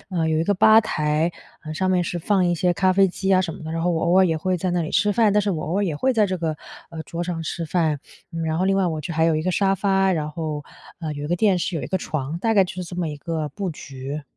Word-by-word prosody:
呃， 170 -4 -1
有 155 - +1
一 160 - +1
个 205 +3 +2
吧 220 +4 +7
台， 155 -4 0 0.3
呃， 155 -1 -6
上 185 +2 0
面 180 -1 +2
是 175 0 -3
放 195 +2 +1
一 175 - +2
些 175 +2 +1
咖 185 +1 +2
啡 195 +1 +5
机 190 +2 -3
啊 - - +5
什 165 -3 -3
么 - - -10
的。 160 - -6
然 165 0 -2
后 180 - +2
我 165 - 0
偶 175 +2 +3
尔 190 - +6
也 165 -3 +1
会 185 +2 0
在 180 +1 -2
那 175 0 0
里 160 - -3
吃 205 0 +2
饭， 220 0 +3
但 210 - +3
是 205 - 0
我 160 -5 -2
偶 175 +5 -1
尔 205 - +1
也 165 - -1
会 260 - +1
在 215 -2 +4
这 185 -2 -2
个， 160 -2 -2 0.3
呃， 160 -1 -6
桌 170 +1 -5
上 175 -2 -3
吃 165 +1 -4
饭。 155 -4 0 0.5
然 160 0 -1
后 185 - +1
另 195 0 +2
外 190 - +2
我 160 -2 -2
就 170 - -4
还 160 +1 +2
有 160 -2 +2
一 155 - -1
个 185 +1 0
沙 195 +1 +2
发， 195 0 +2
然 155 -4 -1
后， 150 -2 -4 0.4
呃， 155 -3 -3
有 145 0 -6
一 - - -2
个 175 +3 0
电 195 -2 +3
视， 170 0 -2
有 - - -3
一 - - -4
个 190 - -1
床， 155 0 -4
大 225 +3 +1
概 195 -2 +5
就 180 - -7
是 180 - -3
这 175 +1 -8
么 175 -2 -1
一 150 - -6
个 160 0 -3
布 195 -2 -3
局。 140 -1 -7
175 Hz, 340 characters per minute, -23 LUFS, 160-190 Hz, 0.5 s, 吧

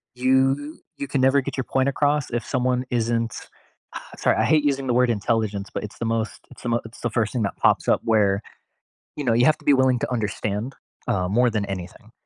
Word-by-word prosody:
you 135 +4 +1 0.2
you 140 - -4
can 135 -1 0
never 135 +1 +4
get 140 +1 -6
your 130 - 0
point 135 +2 +1
across 145 0 0
if 120 0 -2
someone 125 -1 0
isn't 115 -2 0 0.8
sorry, - - +2
I - - +2
hate 155 -2 +3
using 135 -2 0
the 125 - +1
word 125 0 +3
intelligence, 105 -2 -1
but - - -3
it's 105 - -8
the 115 - -2
most, 115 0 -2
it's - - -14
the 120 - -2
mo 120 0 +1
it's 115 - -12
the 120 - -1
first 110 -2 0
thing 120 -3 0
that 100 - -3
pops - - +2
up - - +3
where, 105 -3 +2 0.7
you 145 - -4
know, 120 - +2
you 120 +2 +4
have 155 - +4
to - - -19
be 145 - +5
willing 130 -1 +3
to - - -3
understand, 105 +1 -2 0.3
uh, 90 -1 0
more 120 +5 +3
than 105 -2 -1
anything. 95 -3 -8
120 Hz, 225 wpm, -23 LUFS, 110-130 Hz, 0.8 s, be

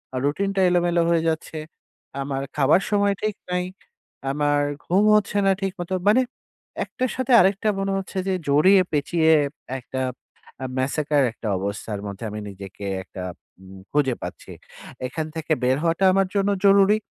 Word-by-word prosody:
আ - - -1
রুটিনটা 195 +6 0
এলোমেলো 175 -1 +2
হয়ে 165 -1 +2
যাচ্ছে। 160 0 -4 0.6
আমার 135 -1 -3 0.2
খাবার 150 +6 +4
সময় 205 -1 +3
ঠিক 215 -1 0 0.2
নাই। 180 0 0 0.7
আমার 145 0 +1 0.3
ঘুম 190 +4 +3
হচ্ছে 205 0 +1
না - - +5
ঠিক 195 -1 0
মতো। 180 +2 -4 0.2
মানে 250 +5 +5 0.6
১ - - -10
টার 255 -1 +1
সাথে 260 0 -1
আরেকটা 195 +3 +2
মনে 195 0 -1
হচ্ছে 195 0 -6
যে 190 - +1 0.2
জড়িয়ে, 185 +7 +6
পেঁচিয়ে 160 +2 +2 0.5
একটা 130 +1 -5 0.6
আ - - -2
Massacre 145 +1 +1
একটা 115 - -7
অবস্থার 100 +1 -4
মধ্যে 100 +2 -7
আমি 105 +1 -6
নিজেকে 100 0 -9 0.2
একটা 95 0 -8 0.4
উ - - -14 0.3
খুঁজে 135 -4 +2
পাচ্ছি। - - -8 0.6
এখান 155 +4 -4
থেকে 160 0 -5
বের 130 +2 +3
হওয়াটা 170 +3 +2
আমার 195 0 +3
জন্য 200 0 +2 0.2
জরুরি। 200 +1 +6
165 Hz, 160 wpm, -23 LUFS, 135-195 Hz, 0.7 s, জড়িয়ে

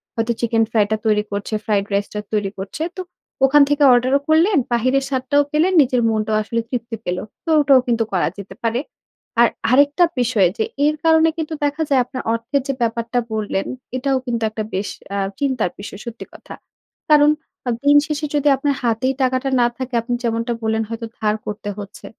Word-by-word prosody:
হয়তো 230 +1 0
চিকেন 230 -1 +2
ফ্রাইটা 215 -1 +2
তৈরি 210 -1 +2
করছে 200 +2 -4
ফ্রাইড 200 -2 +1
রাইসটা 200 +1 -1
তৈরি 205 -2 0
করছে। 195 +11 -5
তো 370 - -4 0.4
ওখান 290 +2 +5
থেকে 290 0 +2
অর্ডারও 255 +3 +3
করলেন, 335 +5 +4 0.2
বাহিরের 255 +3 +2
স্বাদটাও 265 +2 +1
পেলেন, 330 +5 +2
নিজের 250 -2 +2
মনটাও 215 0 0
আসলে 230 +2 -2
তৃপ্তি 235 -2 -4
পেল 180 0 -1 0.3
তো - - -4
ওটাও 275 -2 +5
কিন্তু 230 -1 +2
করা 185 - +2
যেতে 200 -1 -9
পারে। 230 +1 0 0.6
আর 235 - +7 0.2
আরেকটা 285 +6 +4 0.2
বিষয় 225 -6 +3
যে 220 - +1 0.2
এর 305 +1 +2
কারণে 320 0 +5
কিন্তু 320 0 -3
দেখা 290 +2 -1
যায় 270 -3 +4
আপনার 255 +1 -6
অর্থের 245 +5 -1
যে 275 - 0
ব্যাপারটা 230 +1 0
বললেন 205 -2 -2 0.3
এটাও 270 +1 0
কিন্তু 235 -2 -2
একটা 215 0 -4
বেশ 195 +2 -2 0.3
আ - - -1 0.2
চিন্তার 260 -9 0
বিষয় 200 0 -8
সত্যি 235 0 -7
কথা। - - -11 0.6
কারণ 295 -1 +6 0.4
আ - - +1 0.2
দিন 290 0 +6
শেষে 300 0 -2
যদি 290 0 +1
আপনার 280 +1 0
হাতেই 235 +3 +1
টাকাটা 255 +1 +1
না 240 - +4
থাকে 260 -1 -6
আপনি 245 +2 -4
যেমনটা 230 +1 -1
বললেন 220 0 0
হয়তো 230 0 -5
ধার 215 0 +1
করতে 205 0 -5
হচ্ছে। 200 -1 -9
240 Hz, 185 wpm, -20 LUFS, 220-280 Hz, 0.6 s, আর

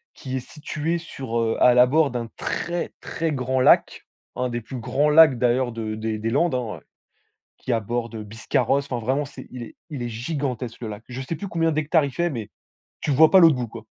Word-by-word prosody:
qui 130 -1 -6
est - - -1
située 155 +2 -3
sur 130 -8 -4
heu, 115 -1 +1
à 125 - +7
l'abord 135 +5 +4
d'un 120 -2 -3
très, 175 0 -3
très 165 -1 -2
grand 130 -1 0
lac, - - +4 0.3
un 125 0 -1
des 120 0 -3
plus 125 +3 -8
grands 145 +6 +1
lacs 150 -4 +7
d'ailleurs, 125 0 +2
de 110 -1 -4
des 110 0 -3
des 115 +1 -2
Landes, 160 +2 +2
hein, 120 -4 -3
heu, - - -34 0.7
qui 125 - -2
aborde 115 0 -3
Biscarrosse. 120 +5 0
Enfin 120 - -1
vraiment 135 +4 +1
c'est 140 -2 -11
il 125 -2 -7
est - - -11 0.2
il 135 -4 -5
est 120 - -3
gigantesque 125 -1 -4
le 115 - -4
lac. 105 +1 -8
Je 125 +2 -5
sais 150 +5 -4
plus 200 - -6
combien 165 -1 +1
d'hectares 155 +1 +2
il 140 - -4
fait, 175 0 0
mais 110 -5 -5 0.5
tu - - -2
vois 155 +3 +6
pas 190 - +7
l'autre 165 -5 +7
bout 120 -2 -3
quoi. 110 0 -10
130 Hz, 220 wpm, -23 LUFS, 115-150 Hz, 0.7 s, à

